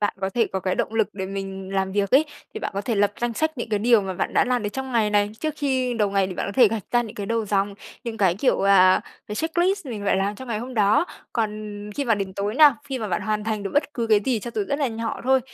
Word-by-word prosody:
Bạn 205 Hz, -, 0 dB
có 190 Hz, 0 st, -1 dB
thể 230 Hz, +2 st, +1 dB
có 190 Hz, -, -1 dB
cái 185 Hz, 0 st, -1 dB
động 220 Hz, -, -2 dB
lực 220 Hz, -2 st, +2 dB
để 190 Hz, -1 st, -4 dB
mình 195 Hz, 0 st, -6 dB
làm 190 Hz, 0 st, 0 dB
việc 200 Hz, -1 st, 0 dB
ấy 280 Hz, +4 st, +6 dB, 0.3 s
thì 435 Hz, -, -5 dB
bạn -, -, -3 dB
có 200 Hz, -, -1 dB
thể 235 Hz, +2 st, -2 dB
lập 205 Hz, 0 st, +2 dB
danh 240 Hz, 0 st, 0 dB
sách 315 Hz, +2 st, -1 dB
những 235 Hz, -, -3 dB
cái 210 Hz, -2 st, +1 dB
điều 230 Hz, +1 st, +4 dB
mà 190 Hz, -1 st, -4 dB
bạn -, -, -2 dB
đã -, -, +4 dB
làm 245 Hz, -2 st, 0 dB
được 205 Hz, -, -1 dB
trong 265 Hz, +4 st, -5 dB
ngày 220 Hz, -3 st, +2 dB
này. 205 Hz, 0 st, +2 dB
Trước 310 Hz, -1 st, -2 dB
khi 260 Hz, -4 st, 0 dB
đầu 210 Hz, -3 st, +1 dB
ngày 195 Hz, -1 st, +2 dB
thì 185 Hz, -, -6 dB
bạn -, -, -3 dB
có -, -, -4 dB
thể 240 Hz, 0 st, +6 dB
gạch 220 Hz, 0 st, -3 dB
ra 240 Hz, 0 st, +3 dB
những 220 Hz, -3 st, -8 dB
cái 200 Hz, -, -5 dB
đầu 230 Hz, +1 st, 0 dB
dòng, 200 Hz, 0 st, 0 dB, 0.3 s
những 230 Hz, -2 st, -4 dB
cái 190 Hz, -5 st, +3 dB
kiểu, 235 Hz, +8 st, +1 dB
à, 190 Hz, -2 st, +5 dB, 0.3 s
cái 210 Hz, -, -5 dB
checklist 345 Hz, -, 0 dB
mình 220 Hz, -5 st, -5 dB
phải 200 Hz, -, +2 dB
làm 195 Hz, +2 st, 0 dB
trong 260 Hz, +4 st, -10 dB
ngày 215 Hz, -, -1 dB
hôm 250 Hz, +3 st, -7 dB
đó. 210 Hz, +7 st, +4 dB, 0.3 s
Còn 220 Hz, -2 st, 0 dB, 0.4 s
khi 285 Hz, -, -1 dB
mà 230 Hz, -3 st, +3 dB
đến 195 Hz, -2 st, -4 dB
tối 200 Hz, +2 st, -2 dB
nào, 290 Hz, -1 st, +7 dB
khi 265 Hz, -2 st, -2 dB
mà 215 Hz, -, -3 dB
bạn 180 Hz, -, -1 dB
hoàn 215 Hz, -1 st, -1 dB
thành 215 Hz, -2 st, -2 dB
được 195 Hz, -, -4 dB
bất 295 Hz, 0 st, +1 dB
cứ 235 Hz, -3 st, -1 dB
cái 215 Hz, -2 st, +4 dB
gì 245 Hz, -4 st, +1 dB
cho 240 Hz, -, -6 dB
dù 210 Hz, -, 0 dB
rất 280 Hz, -, 0 dB
là 280 Hz, -, +1 dB
nhỏ 225 Hz, 0 st, -4 dB
thôi 265 Hz, 0 st, +4 dB
215 Hz, 305 wpm, -24 LUFS, 200-250 Hz, 0.4 s, nào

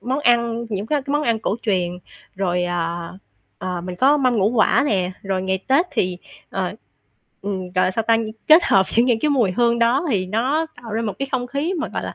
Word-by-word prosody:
món 260 Hz, +3 st, -2 dB
ăn, 235 Hz, -2 st, +2 dB
những 205 Hz, -1 st, -3 dB
cái 290 Hz, +2 st, 0 dB
cái 280 Hz, -, -4 dB
món 295 Hz, +1 st, +1 dB
ăn 230 Hz, -6 st, +1 dB
cổ 215 Hz, -1 st, -2 dB
truyền. 185 Hz, -6 st, 0 dB, 0.4 s
Rồi, 180 Hz, -2 st, 0 dB
à, 170 Hz, -1 st, -3 dB, 0.5 s
ờ, 180 Hz, +3 st, -4 dB
mình 180 Hz, +1 st, -6 dB
có 275 Hz, +8 st, +4 dB
mâm 255 Hz, -4 st, +2 dB
ngũ 200 Hz, -1 st, +3 dB
quả 245 Hz, +4 st, +3 dB
nè. 185 Hz, -8 st, 0 dB
Rồi 195 Hz, -1 st, -2 dB
ngày 190 Hz, 0 st, -1 dB
Tết 285 Hz, +7 st, +4 dB
thì, 185 Hz, -8 st, -1 dB, 0.3 s
ờ, -, -, -2 dB, 0.7 s
ừm, 190 Hz, -2 st, -4 dB
gọi 185 Hz, -, +3 dB
là, -, -, +1 dB
sao 220 Hz, +4 st, -2 dB
ta, 230 Hz, -, +5 dB, 0.3 s
kết 320 Hz, +3 st, +8 dB
hợp 190 Hz, -1 st, +4 dB
những 235 Hz, +2 st, +5 dB
những 240 Hz, -3 st, +2 dB
cái 305 Hz, -, +1 dB
mùi 245 Hz, -9 st, +2 dB
hương 235 Hz, +3 st, +2 dB
đó 245 Hz, +7 st, +2 dB
thì 190 Hz, -5 st, 0 dB
nó 255 Hz, -, 0 dB, 0.2 s
tạo 225 Hz, -3 st, -8 dB
ra 225 Hz, +2 st, -1 dB
một 215 Hz, -3 st, -2 dB
cái 275 Hz, -, -3 dB
không 250 Hz, -2 st, -1 dB
khí 285 Hz, +8 st, -2 dB
mà, 310 Hz, -, -2 dB
gọi -, -, -4 dB
là, -, -, -6 dB
225 Hz, 230 wpm, -21 LUFS, 185-260 Hz, 0.7 s, kết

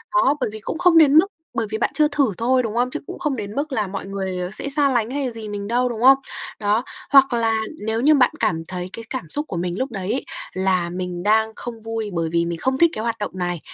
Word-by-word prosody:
Đó, 295 Hz, -5 st, +4 dB
bởi -, -, +1 dB
vì 215 Hz, -, -6 dB
cũng 220 Hz, -, -4 dB
không 355 Hz, -1 st, +5 dB
đến 300 Hz, -3 st, +6 dB
mức 340 Hz, +5 st, +7 dB, 0.3 s
bởi 225 Hz, -1 st, 0 dB
vì 220 Hz, -, -1 dB
bạn 220 Hz, -, +1 dB
chưa 305 Hz, -1 st, +4 dB
thử 280 Hz, -6 st, +1 dB
thôi, 255 Hz, +2 st, +2 dB
đúng 220 Hz, -2 st, -3 dB
không? 245 Hz, +1 st, +2 dB
Chứ -, -, -3 dB
cũng -, -, -7 dB
không 300 Hz, -6 st, -1 dB
đến 210 Hz, -2 st, -6 dB
mức 290 Hz, +2 st, -2 dB
là 215 Hz, -6 st, 0 dB
mọi 190 Hz, 0 st, -5 dB
người 190 Hz, -2 st, -3 dB
sẽ 245 Hz, -, -4 dB
xa 285 Hz, 0 st, +2 dB
lánh 240 Hz, -3 st, 0 dB
hay 275 Hz, -2 st, -2 dB
gì 225 Hz, -2 st, -7 dB
mình 200 Hz, -1 st, -5 dB
đâu, 245 Hz, +3 st, +1 dB
đúng 230 Hz, -2 st, -5 dB
không? 265 Hz, +2 st, +8 dB, 0.4 s
Đó, 210 Hz, +2 st, +1 dB, 0.3 s
hoặc 270 Hz, -2 st, +6 dB
là 225 Hz, -1 st, +1 dB, 0.3 s
nếu 220 Hz, +1 st, 0 dB
như 300 Hz, +4 st, +5 dB
bạn 255 Hz, -3 st, +4 dB
cảm 160 Hz, 0 st, +1 dB
thấy 180 Hz, 0 st, -5 dB
cái 230 Hz, -, -7 dB
cảm 255 Hz, -, -4 dB
xúc 295 Hz, -, -2 dB
của 175 Hz, -, -3 dB
mình 175 Hz, +1 st, -2 dB
lúc 265 Hz, +1 st, -2 dB
đấy 195 Hz, -2 st, -3 dB
ấy 265 Hz, -, -3 dB, 0.3 s
là 185 Hz, -2 st, +1 dB
mình 180 Hz, 0 st, -4 dB
đang 220 Hz, +2 st, +3 dB
không 235 Hz, -2 st, -7 dB
vui 225 Hz, -1 st, -4 dB
bởi 165 Hz, -2 st, -1 dB
vì 170 Hz, 0 st, +2 dB
mình 170 Hz, 0 st, -3 dB
không 260 Hz, 0 st, 0 dB
thích 335 Hz, +3 st, +5 dB
cái 215 Hz, -, -4 dB
hoạt 230 Hz, -1 st, -1 dB
động 205 Hz, -, -3 dB
này, 175 Hz, -2 st, -2 dB
225 Hz, 270 wpm, -22 LUFS, 195-265 Hz, 0.4 s, không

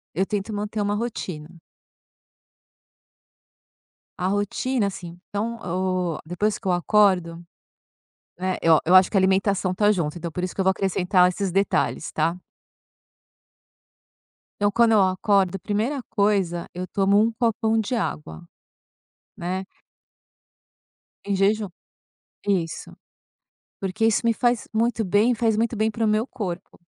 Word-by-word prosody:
Eu 190 Hz, -, +1 dB
tento 210 Hz, +2 st, -3 dB
manter 210 Hz, +1 st, -3 dB
uma 205 Hz, 0 st, 0 dB
rotina. 175 Hz, -8 st, -5 dB, 2.6 s
A 180 Hz, -, 0 dB
rotina, 205 Hz, +3 st, 0 dB
assim, 175 Hz, -2 st, -8 dB
então, 220 Hz, +3 st, -2 dB
o 180 Hz, -1 st, -1 dB
depois 200 Hz, +6 st, -1 dB
que 195 Hz, -, -8 dB
eu -, -, +3 dB
acordo 175 Hz, -2 st, +2 dB, 1.0 s
né, 185 Hz, 0 st, -1 dB
eu 165 Hz, -1 st, +5 dB
a -, -, +2 dB
eu 180 Hz, -, +3 dB
acho 185 Hz, 0 st, +7 dB
que 200 Hz, -, 0 dB
a -, -, +6 dB
alimentação 190 Hz, 0 st, +1 dB
tá 205 Hz, +2 st, +3 dB
junto, 170 Hz, -4 st, -2 dB
então, 170 Hz, -1 st, -5 dB
por 180 Hz, -, -4 dB
isso 185 Hz, -, -3 dB
que -, -, -2 dB
eu -, -, +1 dB
vou 190 Hz, -, +5 dB
acrescentar 185 Hz, -1 st, +2 dB
esses 190 Hz, 0 st, -3 dB
detalhes, 195 Hz, -4 st, 0 dB
tá. 165 Hz, +3 st, 0 dB, 2.3 s
Eu 205 Hz, -, +3 dB
quando 230 Hz, +1 st, +4 dB
eu 210 Hz, -2 st, +5 dB
acordo, 190 Hz, 0 st, +2 dB
primeira 230 Hz, +9 st, -2 dB
coisa, 195 Hz, -5 st, 0 dB
eu 180 Hz, +1 st, -5 dB
tomo 200 Hz, +2 st, +2 dB
um 225 Hz, +2 st, +3 dB
copão 225 Hz, -1 st, 0 dB
de 220 Hz, +3 st, -2 dB
água, 120 Hz, -, -4 dB, 0.9 s
né. 185 Hz, +2 st, -3 dB, 1.6 s
Em 200 Hz, -, 0 dB
jejum. 205 Hz, +1 st, +1 dB, 0.8 s
Isso. 175 Hz, -5 st, -1 dB, 0.9 s
Porque 195 Hz, +3 st, -2 dB
isso 225 Hz, -2 st, +3 dB
me 230 Hz, -, +4 dB
faz 240 Hz, -1 st, 0 dB
muito 225 Hz, 0 st, 0 dB
bem, 205 Hz, +6 st, +3 dB
faz 225 Hz, -1 st, +1 dB
muito 230 Hz, +1 st, 0 dB
bem 220 Hz, +1 st, +1 dB
para 225 Hz, +1 st, -2 dB
o 215 Hz, -, +2 dB
meu 215 Hz, +3 st, +1 dB
corpo, 185 Hz, -10 st, -6 dB
195 Hz, 140 wpm, -23 LUFS, 180-215 Hz, 2.6 s, acho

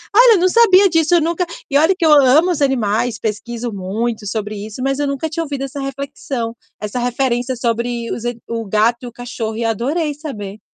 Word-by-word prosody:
Olha, 470 Hz, -1 st, +7 dB
não 365 Hz, +1 st, +3 dB
sabia 395 Hz, -3 st, +6 dB
disso, 325 Hz, 0 st, +3 dB
eu 340 Hz, -, +4 dB
nunca 340 Hz, +3 st, 0 dB, 0.3 s
e 280 Hz, -, +4 dB
olha 325 Hz, +5 st, +4 dB
que 345 Hz, -, +1 dB
eu 315 Hz, -, +5 dB
amo 295 Hz, +5 st, +6 dB
os 325 Hz, -, -2 dB
animais, 235 Hz, -3 st, +1 dB
pesquiso 230 Hz, +2 st, -4 dB
muito 210 Hz, +3 st, -3 dB
sobre 215 Hz, 0 st, -3 dB
isso, 210 Hz, +4 st, -7 dB
mas 275 Hz, +1 st, 0 dB
eu 290 Hz, -, 0 dB
nunca 280 Hz, +3 st, -2 dB
tinha 330 Hz, +2 st, -2 dB
ouvido 280 Hz, -3 st, -4 dB
essa 275 Hz, +1 st, -5 dB
reflexão, 270 Hz, -3 st, -4 dB, 0.2 s
essa 210 Hz, +4 st, -4 dB
referência 245 Hz, +1 st, -1 dB
sobre 235 Hz, 0 st, -2 dB
os 235 Hz, -, -6 dB
e 240 Hz, -1 st, -2 dB
o 230 Hz, -1 st, -3 dB
gato 215 Hz, +4 st, +2 dB
e -, -, -5 dB
o -, -, -8 dB
cachorro 230 Hz, -2 st, -5 dB
e 230 Hz, -, -2 dB
adorei 285 Hz, -, -1 dB
saber. 215 Hz, -9 st, -7 dB
245 Hz, 205 wpm, -18 LUFS, 225-300 Hz, 0.3 s, Olha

